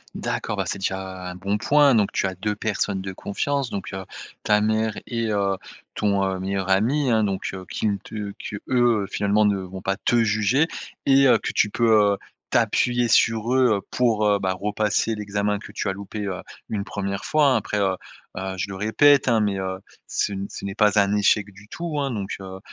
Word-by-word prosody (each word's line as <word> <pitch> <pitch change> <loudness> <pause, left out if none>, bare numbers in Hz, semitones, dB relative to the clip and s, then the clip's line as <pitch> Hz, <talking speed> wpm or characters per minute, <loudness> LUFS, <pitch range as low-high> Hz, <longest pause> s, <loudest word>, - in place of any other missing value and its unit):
D'accord, - - -3
bah, - - 0
c'est - - -3
déjà 95 -1 -4
un 90 - -7
bon 100 +3 -1
point, 145 +3 +5
donc, 105 -3 +2
tu - - 0
as 95 - -1
deux 105 +3 -2
personnes 100 -2 -1
de 95 0 -5
confiance 135 +8 -2
donc 100 -2 -5
heu, 95 -1 -5 0.4
ta 105 0 +3
mère 110 0 +1
et 115 -1 -2
heu, 100 -1 +1 0.4
ton, 100 -2 +1
heu, 95 -1 -2
meilleur 95 0 -2
ami 125 +8 +2
hein, 110 -1 +3
donc 100 -2 -2
heu, 95 -1 -6
qui - - -3
ne 100 - 0
te 105 0 -7
qu'eux, 105 - -6 0.4
heu, - - -5
finalement 105 +1 +2
ne 100 -1 +2
vont 95 0 -7
pas 95 0 -1
te 120 - 0
juger 110 +7 +2 0.4
et 135 0 +5
heu, 125 - +6
que - - -4
tu 105 - +2
peux, 115 +2 +2 0.2
heu, - - -3 0.3
t'appuyer 120 -1 +2
sur 115 0 +3
eux, 125 -4 +4
heu, 100 - -5
pour, 115 -4 +2
heu, 100 -1 +3
bah, 95 -1 -1
repasser 105 +2 0
l'examen 105 -1 -1
que - - -11
tu - - -3
as 95 - -1
loupé, 100 +2 -6
heu, 95 -2 -4 0.3
une 100 -2 -2
1re 100 -1 -4
fois 155 -1 +2
hein. - - +4
Après, 105 - -3
heu 95 -2 +1 0.4
heu, 95 0 -4
je 90 - -1
le 95 - -5
répète 125 +9 +4
hein, 115 -3 +3
mais 100 -2 0
heu, 95 0 -3 0.3
ce 100 - -1
n 100 0 -4
ce - - -7
n'est 100 - -3
pas 105 0 +4
un 100 +1 +3
échec 105 0 +2
du 100 +2 -16
tout 165 +3 -4
hein, 140 - 0
donc 100 -6 -4
heu, 95 0 -8
105 Hz, 220 wpm, -23 LUFS, 95-110 Hz, 0.4 s, heu